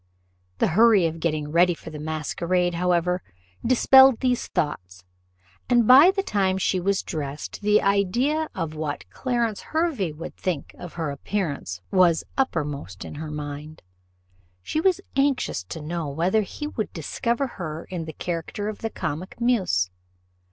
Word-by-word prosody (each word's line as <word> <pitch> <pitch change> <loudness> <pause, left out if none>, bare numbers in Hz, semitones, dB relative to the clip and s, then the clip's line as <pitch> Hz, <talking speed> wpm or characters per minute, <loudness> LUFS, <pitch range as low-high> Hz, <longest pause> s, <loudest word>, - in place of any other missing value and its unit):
The - - +2
hurry 210 0 +5
of 165 0 -2
getting 155 -3 -1
ready 175 +1 +4
for 160 - -10
the 150 - -7
masquerade, 170 +3 -1
however, 180 +1 +1 0.4
dispelled 265 +1 +6
these 250 -2 0
thoughts, 90 - -3 0.7
and 240 -3 +4
by 275 +7 +9
the 390 0 0
time 190 - +1
she 190 0 +1
was 195 +2 0
dressed, 145 +3 -5
the 210 +1 +3
idea 240 +11 +1
of 165 -4 -3
what 155 -2 -4
Clarence 235 -5 -1
Hervey 315 - -1
would 155 +3 -8
think 170 -7 -3
of 175 - -8
her 160 -4 -3
appearance 140 - -3
was 180 -3 +4
uppermost 145 - -2
in - - -8
her 155 +1 -6
mind. 150 +1 -7 0.8
She 315 - -1
was 370 -1 +2
anxious 275 - +1
to 130 - -7
know 160 0 -3
whether 175 +9 +1
he 255 +8 -6
would 225 -8 -3
discover 235 - -1
her 165 - -6
in 175 -3 -3
the 160 - -7
character 175 +6 -4
of 215 - -7
the 225 - -3
comic 165 +2 -5
muse. 190 - +1
180 Hz, 150 wpm, -24 LUFS, 155-230 Hz, 0.8 s, by